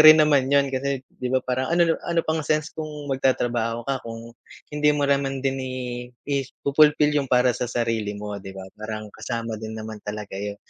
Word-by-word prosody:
rin 155 0 +11
naman 145 -4 +4
yun 140 -1 +3
kasi, 135 0 -1
‘di 125 - -6
ba, 130 - +2 0.3
ano 170 -1 +3
ano 170 -1 +1
pang 160 0 0
sense 155 +1 0
kung 155 -1 -5 0.2
magtatrabaho 120 -3 +1
ka 135 -1 -1
kung 115 0 -8 0.4
hindi 150 0 +2
mo 145 - +2
naman 140 -1 +1
din 135 0 0
i 130 0 -4 0.5
ifu-fulfill 145 +2 +3
yung 145 -2 +1
para 125 0 +4
sa 120 0 -3
sarili 115 -4 -1
mo, 105 0 -5
‘di 95 0 -9
ba, 95 - -6
parang 110 -1 -6
kasama 115 -2 -4
din 110 0 -6
naman 110 -1 -6
talaga 105 0 -6
yun. 100 0 -4
130 Hz, 185 wpm, -24 LUFS, 115-145 Hz, 0.5 s, rin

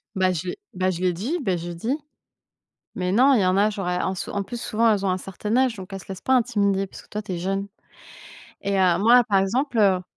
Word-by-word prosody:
Bah, 185 -1 +2
je 180 0 -4
l'ai - - -5 0.2
bah, 185 0 0
je 180 -1 -3
l'ai 180 -1 +2
dit, 230 - -2
bah, 190 -8 0
je 170 +1 -6
l'ai 175 - -6
dit. 235 - -2 1.0
Mais 180 -1 -1
non, 260 +7 +5
il 235 - +4
y - - +2
en 185 0 +2
a, 205 +2 +4
genre, 195 -3 -4
elles 180 0 0
en - - 0
s 185 - -5
en 200 - -2
plus, 235 +5 -7
souvent, 230 0 +1
elles 200 -2 0
ont 190 - +2
un 185 - +1
certain 195 +4 -4
âge, 255 -3 +2
donc 190 -1 -9
elles 195 - -5
se - - -18
laissent 190 -1 -7
pas 260 - +1
intimider 205 -6 +2
parce - - -12
que - - -23
toi, 210 - -4
tu 205 -3 -6
es - - -3
jeune 195 +3 -2 0.9
et 200 0 -1
heu, 180 -2 +4
moi, 235 +5 +6
par 200 -3 +2
exemple, 235 +6 0
heu 190 -3 +4
195 Hz, 275 wpm, -24 LUFS, 185-225 Hz, 1.0 s, moi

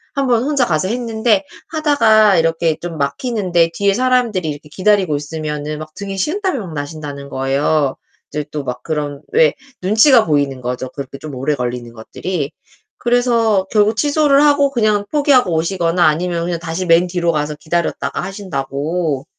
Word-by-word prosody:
1 275 -1 0
번 240 -2 +2
혼자 280 -2 +1
가서 170 0 0
했는데 225 -3 0 0.2
하다가 230 - +4
이렇게 165 -1 +1
좀 170 -2 -5
막히는데 175 - 0
뒤에 200 +1 +1
사람들이 245 -8 +1
이렇게 150 0 -7
기다리고 185 -1 +2
있으면은 150 0 -4
막 155 0 -9
등에 195 -1 -6
식은땀이 365 - -1
막 185 -7 -7
나신다는 145 -1 -6
거예요. 135 +1 0 0.4
이제 150 0 -2
또 150 -2 -4
막 125 -1 -5
그런 145 -3 -3
왜 480 +1 +5 0.3
눈치가 220 +5 +5
보이는 140 -4 0
거죠, 125 +1 -4
그렇게 140 0 -8
좀 145 -1 -8
오래 135 +4 -1
걸리는 120 -2 -4
것들이. 145 +7 -4 0.5
그래서 235 -5 +2
결국 210 0 +3
취소를 290 0 +3
하고 285 -1 +4
그냥 215 -5 +1
포기하고 280 - +3
오시거나 170 +1 +1
아니면 170 +2 0
그냥 170 -1 -2
다시 170 +2 -4
맨 170 +1 +4
뒤로 175 -1 0
가서 150 -1 -2
기다렸다가 170 +3 -2
하신다고. 160 -5 -3
175 Hz, 370 characters per minute, -17 LUFS, 150-220 Hz, 0.5 s, 왜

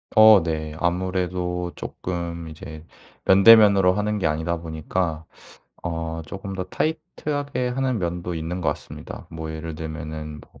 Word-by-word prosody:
어 110 -4 +9
네. 80 -2 -3
아무래도 90 0 -1
쪼끔 85 -2 -5
이제 80 0 -10 0.4
면대 100 +4 +9
면으로 100 -4 +5
하는 105 +1 -1
게 90 - +1
아니다 80 +2 -1
보니까 80 0 -2 0.6
어 80 -1 -3
쪼끔 95 0 -6
더 95 -1 -3
타이트 155 - -3
하게 145 -3 -1
하는 130 -1 0
면도 85 0 -2
있는 80 +3 -3
것 85 - 0
같습니다. - - -8
뭐 80 -1 -5
예를 80 0 -6
들면은 80 -1 -6
뭐 - - -19
85 Hz, 290 characters per minute, -24 LUFS, 80-95 Hz, 0.6 s, 어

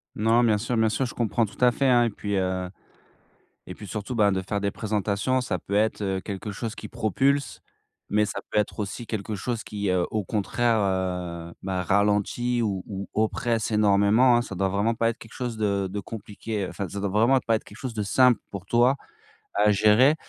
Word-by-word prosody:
Non 115 +3 +3
bien 110 -3 +3
sûr, 120 +3 -2
bien 110 0 +3
sûr, 130 +4 -1
je - - -9
comprends 115 0 +1
tout - - -15
à 125 - +6
fait, 135 +2 0
hein 120 -1 +5
et 115 - +2
puis, 100 0 -3
heu, 95 -1 -1 1.0
et 90 - -7
puis 105 +2 -10
surtout, 105 +4 -5
bah, 105 -4 +4
de 95 -1 0
faire 100 +2 -3
des 100 - +1
présentations 105 +4 -1
ça 105 -7 -2
peut 100 - -7
être, 105 +1 +1
heu, 95 -1 -1
quelque 100 +1 -5
chose 110 +3 -5
qui - - -8
propulse. 135 +5 0 0.5
Mais 105 +1 +3
ça 100 - -4
peut - - -1
être 105 - -2
aussi 105 +3 -4
quelque 105 -1 -4
chose 115 +3 -3
qui, 100 -2 -3
heu, 90 -1 +2
au 110 -1 -1
contraire, 115 +3 0
heu, 90 -3 -2
bah 95 -1 -1
ralenti. 105 +6 +1
Ou 100 -4 -1
ou 100 -1 -5
oppresse 110 +1 0
énormément, 105 +4 +4
hein - - +2
ça 105 - -8
doit 95 +1 0
vraiment 100 +4 +1
pas 115 0 +2
être 115 - -4
quelque 110 - -13
chose 120 -3 -4
de 100 -2 0
de 100 +2 -4
compliqué. 105 -1 -5
Enfin 100 - -4
ça 100 - -5
doit 100 0 -1
vraiment 115 +7 +4
être 130 - -3
pas 115 - +4
être 110 - -3
quelque 105 - -14
chose 130 -3 -5
de 105 - -1
simple 125 +4 +4
pour 100 -1 -7
toi 120 +4 +4 0.6
à 105 +1 +4
gérer! 110 +8 +5
105 Hz, 220 wpm, -25 LUFS, 100-115 Hz, 1.0 s, à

